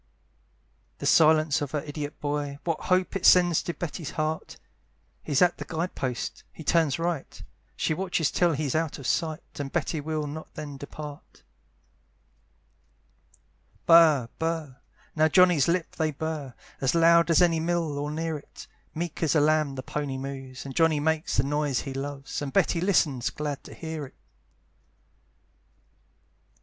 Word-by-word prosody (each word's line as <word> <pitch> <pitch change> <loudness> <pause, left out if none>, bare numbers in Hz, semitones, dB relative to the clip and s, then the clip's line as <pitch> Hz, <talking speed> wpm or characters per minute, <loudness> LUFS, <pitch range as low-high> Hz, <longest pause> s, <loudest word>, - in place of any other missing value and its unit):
The - - -6
silence 155 -1 +4
of 145 - -2
her 150 - 0
idiot 145 0 -6
boy, 145 -1 -2
What 165 -2 -2
hopes 185 +1 +1
it 185 - -11
sends 175 -3 +6
to 175 - -4
Betty's 170 -2 -5
heart! 155 0 -3 0.6
He's 145 +3 +2
at 175 -1 +2
the - - -3
guide 170 +2 -3
post 125 -3 -4
he 160 - -11
turns 160 -3 +2
right, 165 -4 -3 0.4
She - - 0
watches 175 -3 0
till 175 -2 +2
he's 145 -2 -2
out 160 -1 -1
of 140 - -10
sight, 160 +2 -1 0.2
And 140 -1 -4
Betty 160 -2 -1
will 155 0 -2
not 155 +2 -8
then 145 -2 -7
depart. 145 +1 -10 2.4
Burr, 160 -7 +6
burr 160 -5 -2 0.4
now 155 0 +4
Johnny's 175 -3 +5
lips 170 0 -1
they 160 -1 +2
burr, 150 -3 -5 0.3
As 135 +4 +1
loud 170 0 +5
as 165 - +5
any 170 -2 +4
mill, 165 -3 -1
or 145 +1 -3
near 160 0 -3
it, - - -13 0.3
Meek 170 0 -4
as 160 -3 +2
a - - +5
lamb 155 -1 +2
the 130 - -5
pony 140 -2 -3
moves, 135 -1 -7
And 135 - -7
Johnny 160 -2 +3
makes 160 +1 0
the 120 - +4
noise 145 -2 0
he 135 - -6
loves, 140 +1 -5
And 140 -2 -4
Betty 175 -2 +2
listens, 150 -10 +2
glad 145 -2 -4
to - - -10
hear 160 -3 -5
it. - - -21
155 Hz, 160 wpm, -27 LUFS, 145-165 Hz, 2.4 s, sends